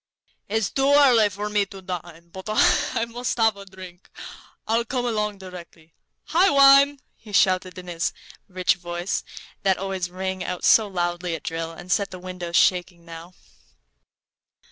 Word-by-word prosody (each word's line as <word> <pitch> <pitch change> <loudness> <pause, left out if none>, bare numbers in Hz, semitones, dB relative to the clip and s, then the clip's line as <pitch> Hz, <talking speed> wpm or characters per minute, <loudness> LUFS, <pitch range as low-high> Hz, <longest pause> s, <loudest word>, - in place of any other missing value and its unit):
"It's 220 0 -1
too 270 +1 +1
early 245 -7 +5
for 205 +2 -5
me 210 -1 0
to 195 0 -11
dine, 175 -2 -8
but 190 +2 -10
I 220 +1 +2
must 240 +1 -4
have 225 -2 +3
a 200 0 -12
drink. 185 -1 -13 0.6
I'll 230 +1 +1
come 245 +1 -3
along 210 -3 -2
directly. 175 -4 -12 0.4
Hi, 360 +4 +4
wine!" 275 0 +6 0.2
he 215 - -14
shouted, 185 -2 +2
in 180 - -9
his 170 -2 -2 0.4
rich 185 -1 0
voice, 175 +1 -4 0.4
that 190 -1 +2
always 190 -2 -3
rang 190 0 -4
out 180 -1 -5
so 220 -2 +5
loudly 175 -2 -2
at 160 - -9
drill, 165 0 -4
and 175 +2 -10
set 200 +2 +1
the 185 - -9
windows 180 -1 -6
shaking 175 -1 +2
now. 165 +1 -11
190 Hz, 160 wpm, -23 LUFS, 175-215 Hz, 0.6 s, wine